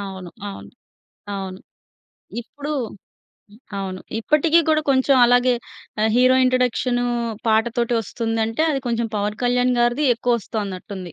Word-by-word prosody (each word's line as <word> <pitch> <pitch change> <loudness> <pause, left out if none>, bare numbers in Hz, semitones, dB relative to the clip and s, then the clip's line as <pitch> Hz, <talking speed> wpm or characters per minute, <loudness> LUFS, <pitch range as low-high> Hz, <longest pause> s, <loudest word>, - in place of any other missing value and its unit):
అవును, 190 -3 -7 0.2
అవును. 195 - -9 0.6
అవును. 190 -1 -5 0.8
ఇప్పుడు 290 +5 -7 1.1
అవును. 185 -1 -4 0.2
ఇప్పటికి 305 +7 +3
కూడా 310 0 +3
కొంచెం 265 +1 +4
అలాగే 245 +1 +4 0.5
ఆహ్, 220 - +3
హీరో 255 +1 +5
ఇంట్రోడక్షను 250 -1 +1 0.4
పాటతోటి 235 +2 +1
ఒస్తుందంటే 225 +3 -2
అది 275 - -1
కొంచెం 235 0 -1
'పవన్ 210 +1 -2
కళ్యాణ్' 245 0 +2
గారిది 240 +5 +2
ఎక్కువ 240 +1 +1
వస్తోన్నట్టుంది. 190 -4 -6
235 Hz, 115 wpm, -21 LUFS, 210-255 Hz, 1.1 s, హీరో